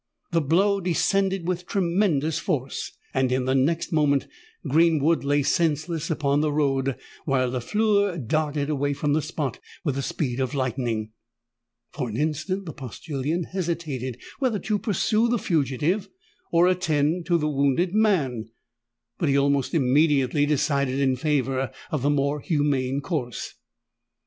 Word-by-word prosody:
The 165 -1 +2
blow 195 +7 +2
descended 190 +1 +1
with 180 -1 -2
tremendous 170 -5 +1
force: 135 -2 -2 0.2
and 130 -1 +1
in 130 0 +1
the 130 - +1
next 150 +6 +1
moment 145 -3 +2 0.4
Greenwood 160 +1 +3
lay 145 +1 +2
senseless 160 +1 0
on 145 -3 +1
the 155 -1 +1
road, 135 -3 +1 0.3
while 130 -3 +1
Lafleur 200 - +1
darted 150 +2 -1
away 145 -1 0
from 145 0 0
the 155 - +2
spot 150 -5 -3 0.2
with 145 -6 0
the 140 - -2
speed 135 -2 -2
of 130 +2 -1
lightning. 120 -4 -2 0.8
For 125 - -3
an 110 - -4
instant 160 +6 -1
the 160 - -6
postillion 140 - -3
hesitated 160 -9 -3 0.2
whether 255 -6 +1
to 210 +1 -1
pursue 215 +3 +1
the 240 - +2
fugitive 160 - 0 0.4
or 170 +1 +5
attend 170 -2 +1
to 175 -2 +3
the 150 -2 0
wounded 140 +5 +1
man; 150 - +1 0.7
but 165 - +1
he 140 - +3
almost 140 +1 +1
immediately 145 0 +3
decided 140 -2 +1
in 135 -2 +2
favour 135 -2 0 0.2
of 155 -5 -1
the 140 - +2
more 145 0 +1
humane 140 -3 0
course. 140 -7 -4
150 Hz, 145 wpm, -25 LUFS, 135-170 Hz, 0.8 s, or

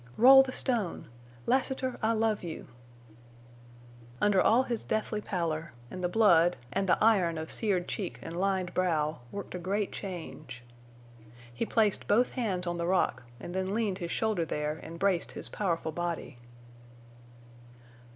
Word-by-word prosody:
"Roll 265 +3 +9
the 265 -1 -2
stone!... 235 -9 -1 0.4
Lassiter, 260 0 0
I 220 +1 +2
love 220 -1 +1
you!" 165 -3 -6 1.5
Under 205 -3 +4
all 240 +4 +4
his 235 -3 -3
deathly 215 0 -2
pallor, 165 - -3 0.2
and 185 - -6
the 175 - +1
blood, 175 -5 +4 0.2
and 195 -1 0
the 170 - +5
iron 190 -7 +3
of 160 0 -5
seared 190 -5 0
cheek 190 -5 -4
and 165 - -6
lined 185 -1 0
brow, 160 -4 0
worked 200 -1 -6
a 180 - -4
great 195 +3 -1
change. 160 -9 -7 0.9
He 220 - -2
placed 215 -3 +1
both 240 +4 +3
hands 195 -8 -1
on 175 0 -2
the 170 0 -2
rock 185 0 +1 0.2
and 175 - -7
then 190 +2 -1
leaned 210 -5 -1
his 170 - -4
shoulder 215 -2 0
there 150 0 -3
and 165 +1 -9
braced 185 -1 0
his - - -8
powerful 170 -5 -1
body. 170 -6 -4
185 Hz, 150 wpm, -30 LUFS, 170-215 Hz, 1.5 s, Roll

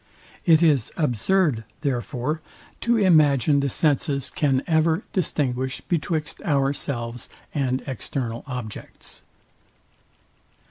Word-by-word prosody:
It 165 0 +6
is 145 -8 +3
absurd, 150 - +1 0.2
therefore, 140 +2 -2 0.4
to 235 0 +2
imagine 150 - +4
the 140 0 0
senses 140 -1 +1
can 135 -3 +1
ever 160 +2 +2
distinguish 130 - -1
betwixt 155 -2 -2
ourselves 135 -5 -1 0.2
and 130 -3 0
external 125 -2 -4
objects. 125 -5 -7
140 Hz, 90 wpm, -24 LUFS, 125-160 Hz, 0.4 s, It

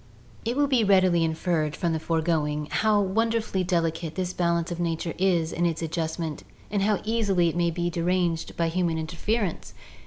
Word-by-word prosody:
It 235 +3 -1
will 290 0 +3
readily 195 -9 +4
be - - +2
inferred 160 -1 0
from 170 -2 -1
the 160 - -1
foregoing 155 -2 0
how 215 -1 +3
wonderfully 220 0 0
delicate 165 -2 -1
this 185 -1 -2
balance 170 -1 0
of 170 - -4
nature 165 -1 -2
is 175 -4 +2
in 175 0 +1
its 165 0 -2
adjustment 160 -1 -3 0.3
and 205 -1 0
how 205 0 +1
easily 205 -6 +2
it 165 - -5
may 175 -1 +2
be 175 +1 -2
deranged 175 -1 -1
by 170 -1 +1
human 170 -1 0
interference. 175 +5 -2
175 Hz, 175 wpm, -26 LUFS, 165-190 Hz, 0.3 s, readily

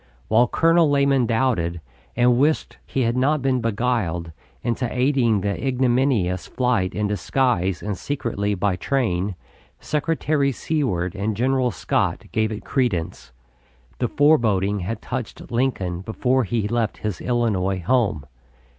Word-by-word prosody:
While 115 +3 +4
Colonel 165 +1 +3
Lamon 140 -3 +3
doubted, 110 -8 0 0.4
and 120 0 +3
wished 150 +3 +1
he 135 - -1
had 115 +1 +1
not 135 +2 +1
been 130 -2 +1
beguiled 110 -7 -1 0.3
into 120 +1 -1
aiding 125 -3 +2
in 100 - 0
the 100 +6 -2
ignominious 125 -7 +1
flight 125 -8 0
in 105 - 0
disguise 105 -3 0
and 105 -1 -2
secretly 105 -4 -2
by 95 0 0
train, 100 -7 -1 0.4
Secretary 150 -2 0
Seward 105 - -1
and 100 +1 -2
General 130 +1 +2
Scott 90 - -1
gave 110 0 0
it 105 -1 -6
credence. 105 - -2 0.7
The 125 - +1
foreboding 110 -10 +2
had 105 +5 -4
touched 125 -2 -6
Lincoln 110 -8 -1
before 125 +5 0
he 105 +1 -1
left 115 -1 -1
his 105 -5 -3
Illinois 105 -6 0
home. 110 - +1
115 Hz, 135 wpm, -22 LUFS, 100-130 Hz, 0.7 s, While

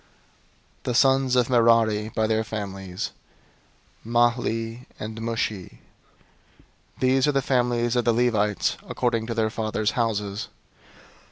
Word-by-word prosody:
003:020 - - -37
The 125 - -1
sons 135 0 +4
of 125 -2 +3
Merari 115 -3 +3
by 110 0 0
their 110 0 +1
families: 95 -4 -5 0.9
Mahli 120 0 0
and 110 +1 -6
Mushi. 110 -4 -3 1.2
These 130 +1 +3
are - - +4
the 135 -1 +1
families 120 -2 +1
of 120 - +1
the 120 - +4
Levites 110 -4 +1
according 115 -3 -1
to 115 - -3
their 110 -1 +1
fathers' 110 -1 -1
houses. 105 -3 -2
115 Hz, 120 wpm, -24 LUFS, 110-120 Hz, 1.2 s, sons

